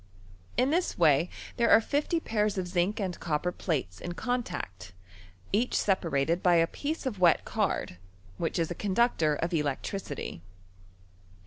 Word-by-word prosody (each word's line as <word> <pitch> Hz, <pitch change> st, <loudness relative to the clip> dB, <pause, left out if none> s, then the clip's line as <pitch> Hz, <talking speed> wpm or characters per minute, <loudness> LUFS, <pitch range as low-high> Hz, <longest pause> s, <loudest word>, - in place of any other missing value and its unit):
In 255 Hz, +3 st, +3 dB
thk 350 Hz, +3 st, +1 dB
naj 160 Hz, 0 st, +4 dB, 0.3 s
there 235 Hz, -1 st, +3 dB
are -, -, +8 dB
fifty 290 Hz, +8 st, 0 dB
pairs 210 Hz, -7 st, 0 dB
of 185 Hz, -1 st, -1 dB
zinc 180 Hz, +5 st, 0 dB
and 185 Hz, -4 st, -3 dB
copper 165 Hz, +2 st, -1 dB
plates 130 Hz, -, -3 dB
in 175 Hz, -, -4 dB
oontncty 175 Hz, -, -4 dB, 0.6 s
each 230 Hz, +5 st, +1 dB
separated 170 Hz, -4 st, +1 dB
by 180 Hz, -1 st, +4 dB
a 165 Hz, 0 st, +5 dB
piece 295 Hz, -, -4 dB
of 225 Hz, -7 st, -3 dB
wet 175 Hz, -2 st, +4 dB
card, 90 Hz, -, -1 dB, 0.4 s
which 165 Hz, -, -1 dB
is 165 Hz, 0 st, 0 dB
a -, -, 0 dB
coodnctcM' 190 Hz, -6 st, +1 dB
of 170 Hz, -, -1 dB
electricitr. 150 Hz, -, -3 dB
180 Hz, 145 wpm, -29 LUFS, 160-220 Hz, 0.6 s, are